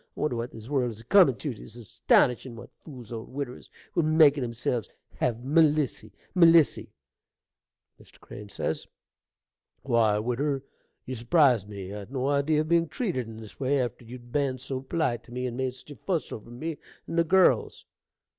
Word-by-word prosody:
I - - -7
wonder 150 -5 0
what 115 +1 -4
this 110 0 -11
world 130 -3 0
is 110 -1 -9
a - - -18
comin' 180 - +6
tew: 145 +1 -4
'tis 110 0 -11
astonishin' 120 - +1
what 115 - -11
fools 125 -7 -10
old 115 0 -7
widdiwers 130 -2 -6 0.2
will 170 - +2
make 155 -2 +5
o' 140 - -3
themselves! 120 -2 -2 0.3
Have 120 0 -1
Melissy! 150 -6 +2 0.2
Melissy! 165 -4 +5 1.1
Mr. 105 0 -12 0.3
C. - - -17 0.9
Why, 115 -5 +3
widder, 135 +5 -1 0.4
you 130 - -5
surprise 120 - +3
me. 100 -2 -7
I'd 105 +2 -8
no 135 0 -1
idee 145 +2 +2
of 155 +1 +1
being 170 0 +3
treated 155 - -3
in 110 -1 -9
this 110 -2 -11
way, 140 +1 +1
after 120 -1 -3
you'd 120 +1 -11
ben 140 -2 0
so 130 +1 -5
polite 135 -4 -1
to - - -16
me, 125 +1 -3
and 120 -2 -3
made 130 0 -2
such 130 - -13
a - - -8
fuss 170 - -2
over 110 +1 -8
me 150 +6 -5 0.3
and 170 - -2
the - - +5
girls. 170 - +3
130 Hz, 180 wpm, -27 LUFS, 115-150 Hz, 1.1 s, comin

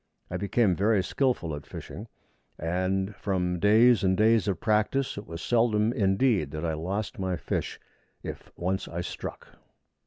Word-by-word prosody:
I - - -1
became 100 -1 +2
very 100 0 +2
skilful 120 - 0
at 75 - -10
fishing, - - -8 0.5
and, 95 +4 -1
from 90 -3 -1
days 110 +4 +5
and 95 -1 +2
days 110 0 +4
of 100 - 0
practice, 115 +4 +1
it 100 - -8
was 85 +1 -7
seldom 115 -2 +2
indeed 100 - +2
that 75 +2 -4
I 80 - 0
lost 95 +7 -3
my 95 -2 -1
fish - - -3 0.4
if - - -8
once 95 +2 -2
I 85 - -4
struck. - - -7
95 Hz, 155 wpm, -27 LUFS, 90-110 Hz, 0.5 s, days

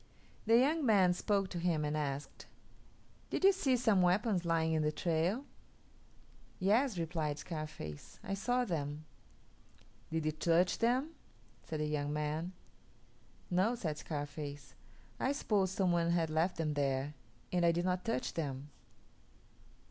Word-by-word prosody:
The 225 +1 +6
young 295 +6 +3
man 195 -7 +5
spoke 195 +2 0
to 175 - -4
him 165 -3 +1
and 150 +1 -1
asked, 145 -1 -4 0.8
"Did - - -2
you 390 - +8
see 275 -10 +1
some 220 -6 +3
weapons 180 +1 +2
lying 165 -1 +2
in 155 - +2
the 150 0 +1
trail?" 170 - 0 1.1
"Yes," 215 +4 +2
replied 160 -3 -2
Scarface, 155 - -7
"I 195 - -3
saw 245 +5 +1
them." 150 -5 -3 1.0
"Did 160 -1 -2
you 155 - +2
touch 170 +3 +2
them?" 255 +7 +2 0.5
said 155 -1 -4
the - - +1
young 145 -1 -1
man. 150 +4 -2 1.0
"No," 190 +7 +2
said 155 -9 -3
Scarface; 145 -2 -6 0.5
"I 265 - +1
supposed 195 -8 0
some 185 -3 +2
one 170 -1 +2
had 165 -2 +1
left 165 +4 +1
them 155 -2 -1
there, 140 0 0 0.4
and 180 -1 +1
I 170 - +5
did 175 +1 -1
not 180 0 0
touch 230 +2 -2
them." 145 -2 -4
170 Hz, 145 wpm, -34 LUFS, 150-200 Hz, 1.1 s, you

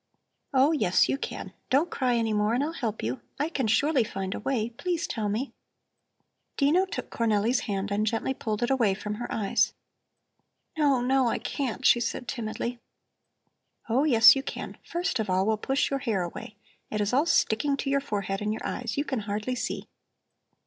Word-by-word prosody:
"Oh, 270 +2 +4
yes, 185 - +3
you - - +1
can. - - -6 0.2
Don't 290 +6 +2
cry 250 -2 +1
any 225 -2 +1
more 210 +2 +2
and 260 - +1
I'll 310 - -1
help 225 -9 -3
you. 120 +4 -2 0.2
I 300 +3 0
can 270 -8 -1
surely 275 +4 +3
find 195 -2 -4
a - - -4
way. 235 -1 -1
Please 340 +7 -2
tell 215 -3 -2
me." 230 +7 -2 1.0
Dino 325 +7 +3
took - - -6
Cornelli's 230 +1 +2
hand 200 0 -2
and 210 +2 +1
gently 225 +4 0
pulled 215 -3 -3
it 240 - +1
away 230 -7 +3
from 210 +1 -4
her 240 - -4
eyes. 205 -3 +1 1.0
"No, 285 -5 +3
no, 260 0 +3
I - - +1
can't," 265 -2 -3
she 240 - +6
said 235 +1 -3
timidly. 235 +1 -4 1.1
"Oh, 250 +5 +3
yes, 235 -5 +8
you 270 - -1
can. - - -6
First 345 -5 -2
of 215 - -2
all, 185 +1 +2
we'll 220 0 +2
push 270 +7 0
your 275 - 0
hair 220 -8 0
away. 175 +4 -7 0.3
It 215 - -2
is 205 +2 0
all 285 +6 +3
sticking 280 -2 +2
to 275 - -2
your 280 0 +2
forehead 200 -6 -3
and 210 0 -1
your 215 - -4
eyes; 240 -1 -3
you 285 - 0
can 265 -5 -2
hardly 210 +4 -3
see." 250 - -4
235 Hz, 190 wpm, -27 LUFS, 210-275 Hz, 1.1 s, yes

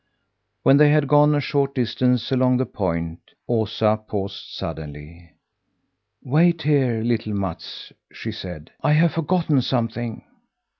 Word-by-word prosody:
When 135 - +6
they 150 0 +6
had 150 -1 +3
gone 150 +1 +5
a - - +2
short 140 -1 -1
distance 125 0 0
along 130 -1 +3
the 130 - 0
point, 85 -6 -3 0.3
Osa 110 -1 +1
paused 100 -2 -4
suddenly. 75 +2 -8 0.9
"Wait 160 +4 +2
here, 130 -7 +2
little 115 -3 -1
Mats," 95 -4 -6 0.2
she - - -6
said; 85 -4 -8
"I 150 - +3
have 165 +2 +4
forgotten 165 -3 +1
something." 120 -2 -2
120 Hz, 130 wpm, -22 LUFS, 100-145 Hz, 0.9 s, When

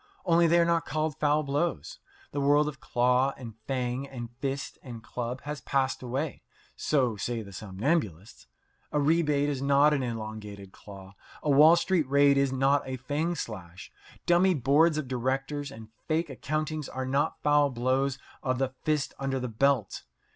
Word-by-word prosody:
Only 170 -1 +4
they 170 +1 +4
are 170 - +4
not 170 -1 +1
called 155 0 -1
foul 150 +1 +2
blows. 170 - -2 0.3
The 145 - -2
world 145 +2 +4
of 145 -3 -6
claw 125 +2 +1
and 115 -3 -8
fang 130 0 -2
and 120 -3 -7
fist 140 0 -4
and 120 -4 -9
club 125 +1 -5
has 150 0 -6
passed 135 -1 0
away 130 +4 -3 0.3
so 125 -7 +1
say 115 +2 -3
the 100 -1 -12
somnambulists. 95 - -3 0.4
A 150 - +1
rebate 145 -1 +2
is 140 -3 -2
not 140 +2 +4
an 140 - 0
elongated 110 -4 -6
claw. 95 -1 -12 0.3
A 150 - +1
Wall 150 +4 +7
Street 175 -6 0
raid 140 0 +5
is 140 -1 +2
not 135 +2 +2
a 130 0 -4
fang 150 +7 -2
slash. 95 - -7 0.3
Dummy 180 +1 +4
boards 150 +4 +3
of 155 -4 -3
directors 135 +3 -2
and 110 -4 -11 0.2
fake 160 0 0
accountings 155 +2 -3
are 130 0 -4
not 140 +2 0
foul 145 -1 +4
blows 130 +2 0 0.2
of 130 -1 -1
the 135 0 0
fist 150 -2 -1
under 135 -1 -1
the 125 -1 -4
belt. 120 -2 +1
135 Hz, 170 wpm, -28 LUFS, 125-150 Hz, 0.4 s, Wall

